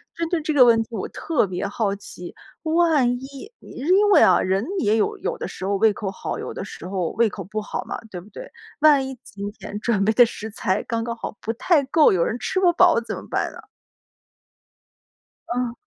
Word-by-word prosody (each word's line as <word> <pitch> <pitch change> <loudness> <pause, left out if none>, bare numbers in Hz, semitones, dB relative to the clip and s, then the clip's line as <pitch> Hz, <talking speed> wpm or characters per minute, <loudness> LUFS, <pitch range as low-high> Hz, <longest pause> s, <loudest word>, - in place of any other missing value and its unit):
针 335 -1 -3
对 345 -3 0
这 310 0 -2
个 265 -3 +7
问 230 -2 +5
题， 225 - -5
我 220 - -4
特 320 -9 0
别 185 +1 -3
好 205 -1 -1
奇， 180 -3 -10 0.3
万 320 -5 +3
一 275 - -10
你 - - -14
因 375 +9 +2
为 - - +7
啊， 185 - +5
人 190 +4 0
也 215 0 +2
有 215 - 0
有 - - -3
的 - - -5
时 190 - -7
候 200 - 0
胃 215 +2 +4
口 205 -1 -4
好， - - -5
有 - - -6
的 - - -5
时 - - -9
候 185 -3 -2
胃 230 -1 +2
口 195 -2 -6
不 215 +4 -4
好 205 - -5
嘛， - - -6
对 180 -3 -7
不 205 - -17
对？ - - -10 0.3
万 290 -3 +5
一 265 -1 -7
今 200 0 -7
天 205 -1 -8
准 205 -4 +1
备 220 - +3
的 245 - +7
食 220 -1 -7
材 200 -2 -1
刚 230 -1 -2
刚 235 0 -3
好 - - -6
不 225 - -2
太 295 +4 +2
够， 290 -2 +4
有 170 -2 +2
人 235 - -2
吃 230 +11 -3
不 355 -2 +5
饱 345 -8 +4
怎 230 - -5
么 - - -10
办 - - -1
呢？ - - -12 1.9
嗯。 245 -1 -2
230 Hz, 240 characters per minute, -23 LUFS, 200-290 Hz, 1.9 s, 个